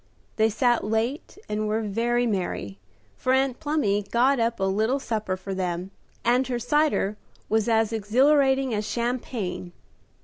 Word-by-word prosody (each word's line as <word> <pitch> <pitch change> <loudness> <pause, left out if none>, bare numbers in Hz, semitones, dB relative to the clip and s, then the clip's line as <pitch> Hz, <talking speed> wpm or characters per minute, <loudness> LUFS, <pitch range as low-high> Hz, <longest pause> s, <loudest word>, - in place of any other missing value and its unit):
They 220 0 +4
sat 240 +2 +2
late 225 - -2
and 215 0 -2
were 220 +1 0
very 235 +4 0
merry, 175 - -3 0.4
for 255 - 0
Aunt 265 -1 +1
Plumy 290 -10 +1
got 245 +6 +2
up 230 -1 0
a - - -1
little 215 +8 +1
supper 215 -7 -2
for 195 +1 -6
them, 180 0 -3 0.3
and 250 +2 +3
her 250 -2 -1
cider 245 -5 +1 0.3
was 220 +1 +1
as 225 0 +2
exhilarating 265 +4 +3
as 210 0 -2
champagne. 235 -7 -3
225 Hz, 145 wpm, -25 LUFS, 205-255 Hz, 0.4 s, They